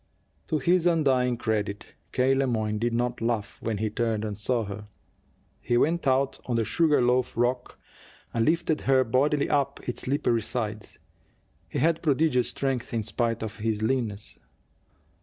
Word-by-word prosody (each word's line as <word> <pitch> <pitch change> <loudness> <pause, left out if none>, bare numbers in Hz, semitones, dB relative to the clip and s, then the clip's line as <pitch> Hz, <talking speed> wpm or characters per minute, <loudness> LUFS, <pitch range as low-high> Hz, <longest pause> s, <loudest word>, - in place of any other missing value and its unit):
To 155 - +1
his 175 +4 +2
undying 130 -7 +2
credit, 105 -3 -2 0.2
K. 130 +1 +3
Le 135 0 +1
Moyne 110 -3 -1
did 120 +1 0
not 120 +1 -1
laugh 115 -3 -2
when 110 -2 -2
he 110 +1 -1
turned 110 -1 -1
and 105 -1 -3
saw 115 +3 -1
her. 105 +1 -7 0.7
He 120 0 +1
went 165 +4 +1
out 135 +1 +2
on 120 - 0
the 115 -1 +1
sugar 155 -3 +3
loaf 125 0 +1
rock, 125 +1 0 0.6
and 115 - +1
lifted 160 +1 +1
her 130 -1 +4
bodily 140 +5 +1
up 140 -1 0
its 125 - -3
slippery 125 -4 +1
sides. 110 -2 -4 0.7
He - - -4
had 165 +4 +2
prodigious 145 -4 +2
strength, 130 -4 -2
in 110 - 0
spite 115 +1 -1
of 110 -1 -6
his 110 -1 -1
leanness. 110 -4 -1
120 Hz, 160 wpm, -27 LUFS, 110-135 Hz, 0.7 s, her